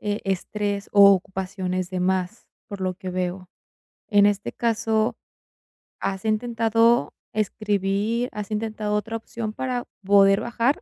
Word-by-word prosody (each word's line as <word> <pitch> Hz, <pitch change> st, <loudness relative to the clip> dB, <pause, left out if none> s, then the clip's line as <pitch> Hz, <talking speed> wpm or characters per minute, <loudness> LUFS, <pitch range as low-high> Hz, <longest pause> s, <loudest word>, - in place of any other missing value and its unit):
eh, 205 Hz, 0 st, -2 dB
estrés 200 Hz, +1 st, -2 dB
o 200 Hz, -1 st, +8 dB
ocupaciones 185 Hz, -1 st, -2 dB
de 185 Hz, -, -2 dB
más, 185 Hz, +3 st, -1 dB, 0.2 s
por 200 Hz, -3 st, -7 dB
lo 185 Hz, -1 st, -1 dB
que 185 Hz, 0 st, -7 dB
veo. 180 Hz, 0 st, -3 dB, 0.6 s
En 205 Hz, -2 st, +5 dB
este 205 Hz, -1 st, 0 dB
caso, 225 Hz, -1 st, 0 dB, 0.8 s
¿has 195 Hz, +1 st, -3 dB
intentado 230 Hz, +1 st, +2 dB, 0.2 s
escribir, 210 Hz, +2 st, 0 dB
has 210 Hz, 0 st, -6 dB
intentado 215 Hz, -1 st, -2 dB
otra 225 Hz, +2 st, -2 dB
opción 225 Hz, -1 st, -5 dB
para 250 Hz, 0 st, -3 dB, 0.2 s
poder 195 Hz, 0 st, +6 dB
bajar, 240 Hz, +4 st, 0 dB
205 Hz, 130 wpm, -24 LUFS, 190-225 Hz, 0.8 s, o